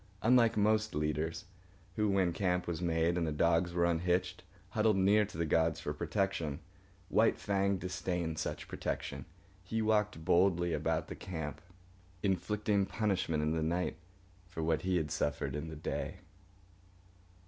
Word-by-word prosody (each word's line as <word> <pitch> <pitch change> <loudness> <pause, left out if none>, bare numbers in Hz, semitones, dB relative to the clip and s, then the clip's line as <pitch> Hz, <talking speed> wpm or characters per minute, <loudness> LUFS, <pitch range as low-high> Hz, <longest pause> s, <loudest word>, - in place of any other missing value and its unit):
Unlike 115 -1 +5
most 110 +1 +2
leaders, 75 +2 -1 0.5
who, 105 -1 +1
when 95 -3 +2
camp 90 0 0
was 85 -1 -3
made 85 0 +1
and 85 - 0
the - - -1
dogs 85 +3 +2
were 85 0 +2
unhitched, 90 +1 0 0.3
huddled 105 +1 +2
near 100 +3 +4
to 100 - -10
the 85 - 0
gods 80 0 +2
for 75 -3 -3
protection, 85 -2 -1 0.5
White 110 +1 +3
Fang 100 -1 +1
disdained 90 -3 -3
such - - -4
protection. - - -4 0.4
He 110 +5 -2
walked 105 -6 +1
boldly 85 -1 +3
about - - -1
the - - -6
camp, 80 -5 -5 0.6
inflicting 100 +1 +1
punishment 95 -8 0
in 75 - +1
the 80 0 0
night 85 +1 -1 0.5
for 80 -3 -4
what 80 -1 +1
he 95 -1 +1
had 75 -3 -2
suffered 70 -1 -1
in 75 +2 -4
the 80 - -7
day. 75 - -4
90 Hz, 150 wpm, -33 LUFS, 80-100 Hz, 0.6 s, Unlike